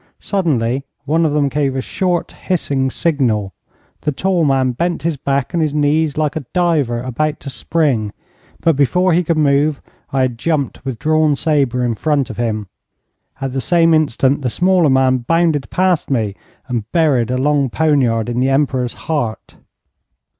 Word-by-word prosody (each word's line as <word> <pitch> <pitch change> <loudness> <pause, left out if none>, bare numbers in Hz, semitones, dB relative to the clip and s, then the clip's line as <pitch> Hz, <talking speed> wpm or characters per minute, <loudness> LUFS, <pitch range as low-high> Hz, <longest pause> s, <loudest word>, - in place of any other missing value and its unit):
Suddenly 135 - 0 0.2
one 160 +3 +2
of 145 - -2
them 145 -1 +2
gave 140 -1 -1
a - - -1
short, 180 +4 -1
hissing 140 -7 -1
signal. 125 - 0 0.5
The 150 - 0
tall 180 +4 0
man 135 -2 +2
bent 170 +8 -2
his 165 -1 0
back 140 +2 -2
and 170 - +1
his 150 -2 0
knees 150 0 +1
like 150 -2 0
a 155 - -3
diver 155 -10 +1
about 150 +5 -2
to 140 - -6
spring, 125 -5 0 0.5
but 165 -2 +3
before 180 +6 +2
he 175 +2 +3
could 165 -1 0
move, 145 0 +2 0.3
I 135 - +1
had 125 -3 -2
jumped 155 -3 -1
with 130 -4 -4
drawn 155 0 +2
sabre 135 -5 +1
in 120 - 0
front 140 +2 0
of 110 - -10
him. 110 -3 -2 0.8
At 135 -1 -3
the 135 - -1
same 165 +1 +3
instant 140 -2 +2
the 130 - -1
smaller 180 +2 +3
man 130 -1 +3
bounded 160 +2 +1
past 185 -2 +1
me, 110 -7 0 0.3
and 115 -4 -4
buried 145 -9 +2
a 125 - 0
long 140 0 +1
poniard 125 -6 +1
in 120 0 -2
the 130 +1 +2
Emperor's 135 -3 0
heart. 140 -9 -3
140 Hz, 170 wpm, -17 LUFS, 130-160 Hz, 0.8 s, but